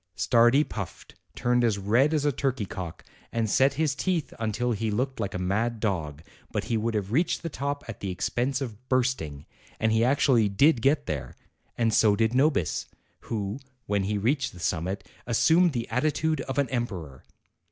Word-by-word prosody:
Stardi 120 Hz, +5 st, +4 dB
puffed, 100 Hz, -, -7 dB, 0.2 s
turned 120 Hz, -1 st, +2 dB
as 110 Hz, -4 st, +2 dB
red 115 Hz, +9 st, +3 dB
as 150 Hz, -2 st, +1 dB
a 145 Hz, -, +3 dB
turkey 130 Hz, -4 st, -1 dB
cock, 90 Hz, -3 st, -7 dB, 0.3 s
and 115 Hz, -1 st, 0 dB
set 135 Hz, +6 st, +3 dB
his 155 Hz, -1 st, +1 dB
teeth 170 Hz, +1 st, -1 dB
until 115 Hz, +2 st, -1 dB
he 110 Hz, 0 st, -1 dB
looked 125 Hz, +5 st, -1 dB
like 100 Hz, -4 st, -3 dB
a -, -, 0 dB
mad 110 Hz, +6 st, -1 dB
dog; 80 Hz, -8 st, -2 dB, 0.3 s
but 105 Hz, -, -1 dB
he 115 Hz, -, -2 dB
would 115 Hz, +1 st, -1 dB
have 100 Hz, -1 st, -2 dB
reached 160 Hz, +8 st, +1 dB
the 165 Hz, -, -2 dB
top 140 Hz, -1 st, -3 dB
at 115 Hz, -, -7 dB
the 100 Hz, -, -4 dB
expense 125 Hz, +8 st, -1 dB
of 125 Hz, -1 st, -7 dB
bursting, 120 Hz, -, 0 dB, 0.3 s
and 110 Hz, 0 st, +2 dB
he 110 Hz, +1 st, +3 dB
actually 125 Hz, -4 st, +3 dB
did 135 Hz, +6 st, +4 dB
get 140 Hz, +4 st, +2 dB
there; 75 Hz, -3 st, -4 dB, 0.4 s
and 115 Hz, -2 st, +2 dB
so 105 Hz, -2 st, +5 dB
did 110 Hz, +2 st, +1 dB
Nobis, 135 Hz, -, +1 dB, 0.4 s
who, 105 Hz, +1 st, -3 dB, 0.3 s
when 100 Hz, -1 st, 0 dB
he 105 Hz, +1 st, -1 dB
reached 130 Hz, +7 st, 0 dB
the 90 Hz, -, -12 dB
summit, 90 Hz, +3 st, -2 dB, 0.2 s
assumed 165 Hz, +9 st, +4 dB
the 120 Hz, -4 st, -3 dB
attitude 155 Hz, +4 st, 0 dB
of 135 Hz, 0 st, -5 dB
an 140 Hz, -1 st, +2 dB
emperor. 95 Hz, -, -4 dB
115 Hz, 185 wpm, -27 LUFS, 100-135 Hz, 0.4 s, so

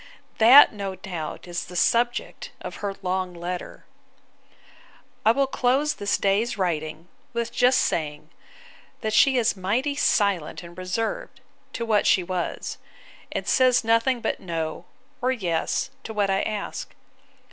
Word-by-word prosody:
That, 245 Hz, +5 st, +9 dB
no 200 Hz, -2 st, -4 dB
doubt, 175 Hz, -4 st, -6 dB
is 175 Hz, 0 st, -4 dB
the 180 Hz, -, -11 dB
subject 240 Hz, -, 0 dB
of -, -, -7 dB
her 200 Hz, -1 st, -4 dB
long 185 Hz, -1 st, -2 dB
letter. 175 Hz, +1 st, -6 dB, 1.4 s
I 220 Hz, -, +6 dB
will 275 Hz, +4 st, +2 dB
close 270 Hz, +3 st, +1 dB
this 200 Hz, 0 st, -1 dB
day's 205 Hz, +4 st, +1 dB
writing, 160 Hz, -3 st, -2 dB, 0.3 s
with 235 Hz, 0 st, -2 dB
just 250 Hz, +1 st, +4 dB
saying, 150 Hz, 0 st, -2 dB, 0.7 s
that 215 Hz, -1 st, -2 dB
she 265 Hz, +4 st, +5 dB
is 230 Hz, -4 st, +2 dB
mighty 220 Hz, +10 st, 0 dB
silent 200 Hz, -, +1 dB
and 170 Hz, 0 st, -11 dB
reserved, 185 Hz, +5 st, -3 dB, 0.3 s
to 235 Hz, -, -3 dB
what 215 Hz, -3 st, +2 dB
she 185 Hz, -, +4 dB
was: 180 Hz, -1 st, -4 dB, 0.5 s
and -, -, -4 dB
says 255 Hz, -2 st, +4 dB
nothing 230 Hz, +2 st, +2 dB
but -, -, -2 dB
No, 165 Hz, -1 st, -4 dB, 0.4 s
or 255 Hz, +1 st, +2 dB
Yes, 185 Hz, +2 st, -1 dB
to 220 Hz, -, -6 dB
what 200 Hz, -2 st, +1 dB
I 195 Hz, -, +1 dB
ask. 210 Hz, -2 st, -4 dB
200 Hz, 140 wpm, -24 LUFS, 180-235 Hz, 1.4 s, That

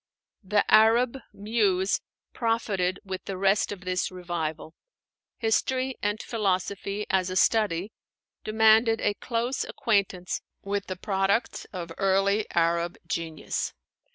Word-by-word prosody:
The 205 Hz, +2 st, +2 dB
Arab 235 Hz, +4 st, +5 dB
muse 200 Hz, -3 st, +1 dB, 0.3 s
profited 210 Hz, -6 st, 0 dB
with 190 Hz, -1 st, -6 dB
the 195 Hz, -, -4 dB
rest 195 Hz, +2 st, +2 dB
of 200 Hz, -3 st, -6 dB
this 185 Hz, 0 st, -1 dB
revival. 165 Hz, -3 st, -4 dB, 0.6 s
History 255 Hz, +3 st, +1 dB
and 205 Hz, +1 st, 0 dB
philosophy, 200 Hz, -1 st, -1 dB
as 185 Hz, -1 st, +2 dB
a 185 Hz, -, -4 dB
study, 200 Hz, -1 st, +2 dB, 0.5 s
demanded 220 Hz, +1 st, +4 dB
a 205 Hz, -, +1 dB
close 235 Hz, +5 st, -2 dB
acquaintance 195 Hz, -5 st, -1 dB, 0.2 s
with 200 Hz, 0 st, -2 dB
the 185 Hz, -, -4 dB
products 195 Hz, +4 st, 0 dB
of 175 Hz, -3 st, -6 dB
early 195 Hz, +2 st, +2 dB
Arab 170 Hz, +1 st, +1 dB
genius. 160 Hz, -3 st, -3 dB
200 Hz, 115 wpm, -27 LUFS, 185-220 Hz, 0.6 s, Arab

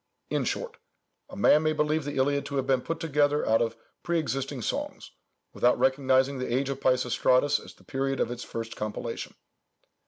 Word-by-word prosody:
In -, -, 0 dB
short, 485 Hz, -1 st, -3 dB, 0.5 s
"a -, -, -10 dB
man 150 Hz, -, +5 dB
may 155 Hz, 0 st, +1 dB
believe 150 Hz, 0 st, 0 dB
the 145 Hz, -, -4 dB
Iliad 140 Hz, +2 st, +2 dB
to 140 Hz, -, -5 dB
have 135 Hz, -1 st, 0 dB
been 130 Hz, -2 st, +2 dB
put 165 Hz, +4 st, -4 dB
together 150 Hz, -2 st, +1 dB
out 110 Hz, 0 st, +4 dB
of 115 Hz, -1 st, 0 dB, 0.3 s
pre 170 Hz, 0 st, 0 dB
existing 135 Hz, -4 st, -2 dB
songs, -, -, -4 dB, 0.4 s
without 125 Hz, 0 st, +3 dB
recognising 130 Hz, 0 st, +2 dB
the 125 Hz, -, -3 dB
age 135 Hz, +3 st, 0 dB
of 135 Hz, -1 st, -3 dB
Peisistratus 125 Hz, +2 st, +2 dB
as -, -, -13 dB
the -, -, -22 dB
period 135 Hz, 0 st, -2 dB
of -, -, 0 dB
its 120 Hz, 0 st, -5 dB
first 115 Hz, 0 st, -6 dB
compilation." 110 Hz, +2 st, -5 dB
135 Hz, 185 wpm, -27 LUFS, 125-145 Hz, 0.5 s, man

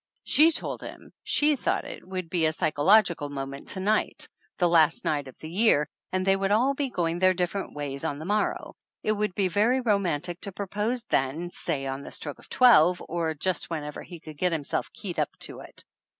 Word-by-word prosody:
She 310 Hz, +3 st, +5 dB
told 330 Hz, -, -3 dB
him -, -, -10 dB
she 295 Hz, 0 st, +3 dB
thought -, -, -1 dB
it -, -, -9 dB
would 185 Hz, -2 st, -4 dB
be 165 Hz, -1 st, +1 dB
a -, -, +1 dB
psycho 155 Hz, -2 st, -1 dB
logical 180 Hz, -6 st, +4 dB
moment 140 Hz, 0 st, -6 dB
to 190 Hz, -, -4 dB
night, 210 Hz, +3 st, 0 dB, 0.3 s
the 175 Hz, -, +3 dB
last 165 Hz, -2 st, +3 dB
night 145 Hz, -2 st, 0 dB
of 130 Hz, -, -12 dB
the 155 Hz, -, -9 dB
year, 170 Hz, -4 st, +3 dB, 0.2 s
and 185 Hz, 0 st, -1 dB
they 195 Hz, 0 st, +4 dB
would 195 Hz, 0 st, -1 dB
all 240 Hz, +7 st, +3 dB
be 275 Hz, -1 st, -2 dB
going 170 Hz, -5 st, -1 dB
their 185 Hz, 0 st, +4 dB
different 180 Hz, +1 st, -2 dB
ways 140 Hz, -2 st, -4 dB
on 140 Hz, -, -2 dB
the 155 Hz, -, -7 dB
morrow. 210 Hz, +3 st, -1 dB, 0.3 s
It 215 Hz, -, +1 dB
would 210 Hz, -3 st, -1 dB
be 195 Hz, -2 st, +2 dB
very 215 Hz, +8 st, +2 dB
romantic 185 Hz, -, 0 dB
to 200 Hz, -, -3 dB
propose 210 Hz, +5 st, -2 dB
then, 160 Hz, -, -1 dB
say 145 Hz, -7 st, -1 dB
on 135 Hz, +1 st, -4 dB
the -, -, -9 dB
stroke 145 Hz, -2 st, -4 dB
of -, -, -17 dB
twelve, 180 Hz, -9 st, +6 dB
or 165 Hz, -1 st, -1 dB
just 185 Hz, +4 st, 0 dB
whenever 150 Hz, -3 st, -5 dB
he 175 Hz, -2 st, -10 dB
could 155 Hz, -2 st, -11 dB
get 180 Hz, -1 st, +2 dB
himself 155 Hz, -4 st, -2 dB
keyed -, -, -6 dB
up -, -, +1 dB
to -, -, -4 dB
it. -, -, -11 dB
180 Hz, 210 wpm, -27 LUFS, 155-205 Hz, 0.3 s, twelve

